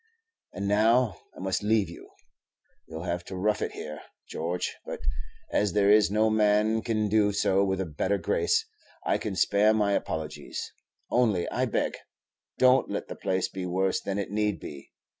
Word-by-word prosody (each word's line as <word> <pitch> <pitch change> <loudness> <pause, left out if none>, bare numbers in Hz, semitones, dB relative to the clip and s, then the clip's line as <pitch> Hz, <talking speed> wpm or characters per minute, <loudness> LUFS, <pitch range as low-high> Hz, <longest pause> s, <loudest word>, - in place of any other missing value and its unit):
And 100 +2 -3
now 110 +2 +3 0.2
I - - -10
must 95 0 -1
leave 105 -1 +2
you. - - -11 0.8
You 80 - -8
'll 80 - -6
have 90 -1 -2
to 95 - -7
rough 105 +3 0
it - - -2
here, 75 0 -7 0.3
George; 85 +2 -3
but - - -6 0.5
as 105 -3 +1
there 100 -1 +4
is 105 -1 +5
no 110 +2 +2
man 110 +1 +3
can 110 -2 0
do 105 0 +3
so 100 -1 +2
with 95 -1 0
a 95 - -1
better 90 +6 -1
grace, 450 - +1 0.4
I - - +1
can 105 -3 -4
spare 105 +3 +3
my 105 -2 +2
apologies; 75 -5 -4 0.4
only, 110 -8 +2
I - - 0
beg, - - -1 0.6
don't 130 +1 +4
let - - -4
the - - -5
place 95 -1 -1
be 95 -2 -5
worse 95 +1 0
than 100 0 -3
it 100 -1 -3
need 105 -1 0
be. 70 -2 -10
100 Hz, 180 wpm, -27 LUFS, 95-110 Hz, 0.8 s, is